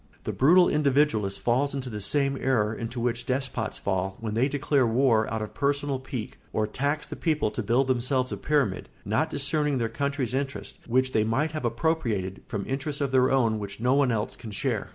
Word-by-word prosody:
The - - -3
brutal 175 +7 +6
individualist 140 -9 +2
falls 135 +4 +1
into 135 -2 -4
the 105 -4 -5
same 140 +7 +1
error 110 -5 +2
into 115 +2 -5
which 120 0 -1
despots 130 -4 -2
fall 95 0 -2
when 110 -2 -4
they 120 +5 +2
declare 140 -2 +1
war 115 -2 +2
out 110 -1 -2
of 105 - -7
personal 140 -1 0
pique 130 -4 -6
or 110 - +1
tax 140 +7 -2
the - - -7
people 155 -9 0
to - - -3
build 120 +5 +2
themselves 130 0 0
a - - -3
pyramid, 135 -12 0 0.2
not 110 +10 +1
discerning 145 -1 0
their 115 -2 0
country's 140 0 -2
interests, 135 0 -3
which 130 +2 +2
they 110 - +2
might 130 +8 0
have 155 -5 -4
appropriated, 115 - -1
from 100 -1 -4
interests 140 +2 -3
of 140 -2 -1
their 130 -1 +4
own 115 -5 +2
which 100 0 -7
no 125 +3 +2
one 140 -2 +3
else 105 -2 -2
can 115 - -9
share. 105 - -2
130 Hz, 200 wpm, -27 LUFS, 110-140 Hz, 0.2 s, brutal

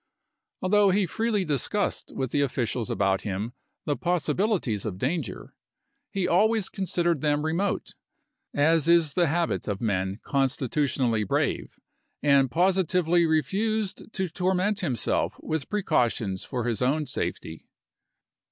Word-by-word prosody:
Although 200 +1 +4
he 195 +1 +2
freely 215 +1 -1
discussed 155 - -1
with 130 -2 -2
the 145 - +1
officials 120 -4 -1
about 95 0 +1
him 105 +4 -4 0.3
the 145 - 0
possibilities 175 - 0
of 100 -4 -4
danger, 150 - -3 0.6
he 195 -4 -1
always 215 +3 +2
considered 175 -5 0
them 150 0 +1
remote, 175 +6 -1 0.6
as 155 +2 +3
is 170 -3 +4
the 175 -2 +3
habit 140 - -1
of 100 -2 -2
men 95 -2 -1
con 135 -1 +2
stitutionally 130 -4 0
brave, 100 - -1 0.4
and 140 -2 +4
positively 175 0 +2
refused 205 +7 -1
to 190 -2 -1
tor 180 +3 0
ment 200 +3 0
himself 135 - 0
with 155 -4 -3
precautions 120 - 0
for 125 -3 -3
his 115 -1 -1
own 145 +5 +1
safety. 80 - -4
155 Hz, 130 wpm, -26 LUFS, 125-185 Hz, 0.6 s, Although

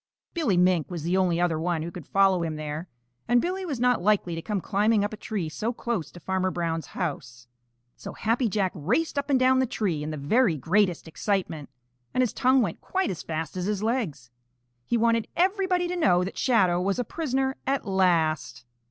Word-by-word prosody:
Billy 275 - +1
Mink 180 -3 +3
was 170 -4 -5
the 175 +3 0
only 180 -3 +2
other 170 -3 +1
one 165 -1 -1
who 170 - -5
could 175 -2 -10
follow 195 -2 +3
him 160 -2 -2
there, 155 +3 -5 0.4
and 240 +1 +4
Billy 370 +5 -2
was 280 -7 -3
not 250 -3 +2
likely 195 -3 +2
to 165 - -4
come 210 +2 -2
climbing 210 +3 +2
up 205 - -2
a - - -3
tree 210 -5 -4
so 210 +9 -2
close 225 - -3
to 175 - -12
Farmer 185 +1 -1
Brown's 165 -2 -2
house. 125 -8 -4 0.5
So - - -8
Happy 230 +2 0
Jack 195 -2 0
raced 245 - 0
up 280 - -5
and 270 -2 +4
down 260 0 +4
the 260 - +2
tree 190 -10 -1
in 150 - -4
the 155 - -4
very 170 - +2
greatest 180 +3 +1
excitement, 165 -4 -2 0.5
and 255 - +3
his 240 - -1
tongue 260 0 +3
went 175 -6 -4
quite 380 - -1
as 180 - -5
fast 160 0 -4
as 180 -1 -2
his 205 0 -1
legs. 175 - -2 0.6
He 240 - +1
wanted 230 0 +2
everybody 370 -1 +1
to 360 - -2
know 180 - +3
that 190 - -5
Shadow 185 -8 +2
was 195 +1 0
a 245 - 0
prisoner 265 -1 -2
at 275 -2 0
last. 165 - +1
195 Hz, 205 wpm, -26 LUFS, 165-240 Hz, 0.6 s, and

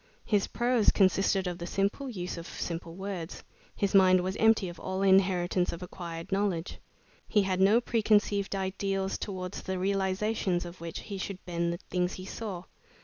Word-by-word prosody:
His 205 -3 +2
prose 240 -2 +2
consisted 195 0 +3
of 175 0 -3
the 170 - -5
simple 200 +9 -1
use 180 -6 -4
of 170 0 -7
simple 165 0 -5
words. 190 -3 -5 0.3
His 200 -1 0
mind 185 -2 +6
was 185 +1 -2
empty 220 -3 +4
of 175 -1 -8
all 190 +1 -2
inheritance 185 -2 +3
of 170 +2 -6
acquired 170 -1 -7
knowledge. 195 -4 -1 0.5
He 210 -2 +3
had 190 -1 0
no 205 +5 +6
preconceived 210 -4 +2
ideals, 195 0 -2
towards 185 -2 -5
the 190 0 -3
realizations 190 -1 0
of 175 0 -10
which 170 -1 -5
he 200 -2 -6
should 190 0 -6
bend 170 -1 -1
the 170 - -3
things 180 0 0
he 185 - -7
saw. 195 -4 -5
190 Hz, 170 wpm, -29 LUFS, 180-200 Hz, 0.5 s, mind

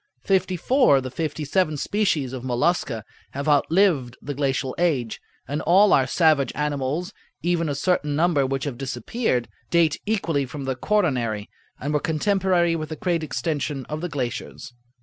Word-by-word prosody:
Fifty 185 -1 +1
four 250 - +4
of 135 - -1
the 130 - -5
fifty 155 +1 -3
seven 155 0 +1
species 155 -8 0
of 130 -2 -6
Mollusca 125 -2 0 0.3
have 140 +2 -4
outlived 150 -4 +2
the 145 - -5
glacial 135 -1 -1
age, 135 -10 0 0.3
and 145 +2 -2
all 195 +5 +5
our 130 -1 +4
savage 155 -2 +3
animals—even 155 +4 -2
a 145 - -1
certain 150 -1 0
number 160 -2 +3
which 135 0 -2
have 135 -5 -4
disappeared—date 130 - -1
equally 165 -10 0
from 145 +1 -7
the 130 -1 -1
quaternary, 125 - 0 0.3
and 145 +2 -3
were 150 - +3
contemporary 175 +1 +1
with 155 -2 -4
the 155 - -4
great 175 -3 -1
extension 145 -1 -3
of 155 +1 -4
the 175 - -3
glaciers. 130 -3 -5
150 Hz, 155 wpm, -24 LUFS, 135-175 Hz, 0.3 s, all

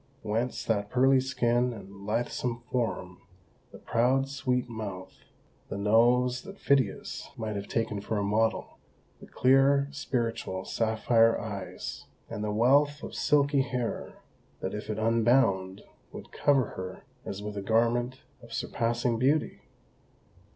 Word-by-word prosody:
Whence 115 +3 -2
that 105 -2 0
pearly 130 +2 +4
skin 125 -1 +1
and 100 -2 -11
lithesome 120 +1 -2
form; 100 -7 -2 0.5
the - - -11
proud, 130 +3 +1
sweet 130 -3 -1
mouth, 100 -5 -7 0.5
the - - -4
nose 120 +4 +3
that 195 +1 -11
Phidias 135 - 0
might 110 -2 -3
have 100 0 -4
taken 105 -3 -1
for 105 +1 -2
a 100 - 0
model; 110 +2 0 0.4
the - - -13
clear, 135 +2 +4
spiritual, 115 -9 -3
sapphire 115 0 +2
eyes, 100 -3 -6 0.2
and 105 - -4
the 105 - -1
wealth 140 +6 +3
of - - -7
silky 140 -1 +3
hair, 125 -3 -3 0.5
that - - -4
if 105 +1 -6
unbound 110 -3 +2 0.3
would - - -10
cover 135 -5 +2
her 95 0 -7 0.2
as 100 +1 -6
with 105 0 -5
a 100 - -3
garment 120 +5 +1 0.2
of 115 0 -12
surpassing 115 +1 -1
beauty? 140 +5 +1
115 Hz, 130 wpm, -28 LUFS, 105-130 Hz, 0.5 s, pearly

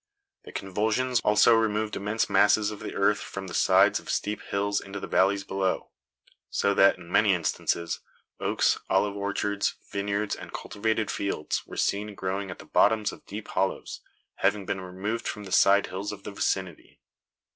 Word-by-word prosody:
The - - -10
convulsions 110 +6 0
also 105 +2 +5
removed 110 -1 +1
immense 105 +3 -1
masses 105 0 +4
of 105 - -8
earth - - +1
from 95 0 -7
the 90 - -8
sides - - +4
of - - -13
steep 105 +1 -1
hills 100 +1 -1
into 100 +1 -7
the - - -5
valleys 95 +1 +2
below; 95 -1 -2 0.6
so 100 - +1
that, 100 -1 +5
in 85 -1 -13
many 105 -2 +4
instances, 85 0 -1 0.4
oaks, - - +1
olive 100 +1 +2
orchards, 100 0 -1 0.2
vineyards 100 +1 -1
and - - -10
cultivated 110 +1 -2
fields, 100 -6 -2
were - - -9
seen 105 +1 -1
growing 95 +1 -3
at 90 - -7
the - - -12
bottoms 110 0 +3
of - - -14
deep 105 +2 -7
hollows, 95 +1 -2 0.4
having 105 -2 +1
been 95 0 -3
removed 95 +5 -4
from 105 - -4
the 95 - -9
side 100 +2 +5
hills 95 +3 -5
of - - -9
the - - -6
vicinity. 95 -3 -3
100 Hz, 170 wpm, -27 LUFS, 95-105 Hz, 0.6 s, also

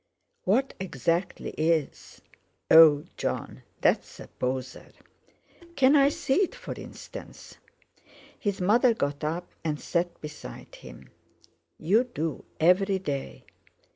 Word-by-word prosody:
"What 250 +9 +2
exactly 170 +1 -2
is—Oh! 155 -1 +2
Jon, - - -4 0.2
that's - - +1
a - - -10
poser." 125 0 -4 0.9
"Can 270 +2 +5
I 280 -1 +6
see 275 -2 -1
it, 395 -2 +1
for - - -7
instance?" - - -11 0.8
His 205 -3 -2
mother 230 +6 +4
got 145 -4 -2
up, 165 +4 -3
and 150 -2 -2
sat 175 0 -2
beside 150 - -10
him. - - -13 0.7
"You 210 +10 +2
do, 165 - -4
every 190 +4 +4
day. 140 - -5
170 Hz, 110 wpm, -27 LUFS, 150-210 Hz, 0.9 s, I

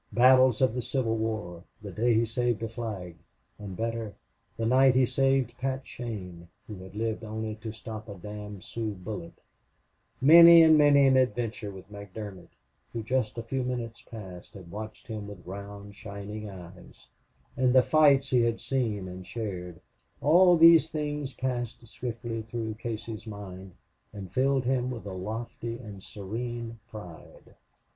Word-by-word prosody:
Battles 130 -1 +6
of 130 - +3
the 125 - -2
Civil 120 -2 -1
War; 110 -6 -3 0.2
the 105 -2 -8
day 115 +4 +2
he 115 +1 +3
saved 115 0 -1
a - - -1
flag; 105 -7 -6 0.4
and, 100 -3 -7
better, 115 -2 -3 0.4
the 115 - -1
night 130 +2 +5
he 130 0 +5
saved 135 -1 +1
Pat 135 +1 -2
Shane, 90 -8 -7 0.2
who 105 - -8
had 95 +1 -12
lived 110 +1 -2
only 110 0 -4
to 110 0 -6
stop 110 0 -8
a 100 - -7
damned 105 +1 -8
Sioux 110 -3 -4
bullet; 90 -2 -7 0.8
many 170 +3 +10
and 160 -1 +7
many 145 -2 +6
an 135 -1 +5
adventure 120 -2 0
with 95 +1 -11
McDermott, 100 -2 -8 0.4
who, 115 - -4
just 120 -1 -1
a 115 - -3
few 130 +3 -2
minutes 120 -2 -4
past, 95 -8 -10
had 90 -3 -11
watched 110 +2 -8
him 110 -4 -6
with 100 -3 -11
round, 100 +1 -8
shining 105 +1 -7
eyes; 90 -1 -13 0.5
and 130 -1 +3
the 130 - +7
fights 140 -3 +4
he 125 -2 +4
had 115 -1 +1
seen 110 -8 -1
and 90 0 -9
shared 90 -7 -5 0.4
all 175 +4 +6
these 165 -1 +7
things 150 -3 -3
passed 120 -2 -3
swiftly 115 -1 -5
through 110 0 -4
Casey's 115 0 -6
mind 95 -3 -8 0.4
and 95 -4 -8
filled 135 0 +2
him 125 0 +1
with 120 -4 -6
a 100 - -5
lofty 115 +4 -5
and 105 -5 -10
serene 115 +4 -6
pride. 90 -7 -12
115 Hz, 160 wpm, -28 LUFS, 100-125 Hz, 0.8 s, many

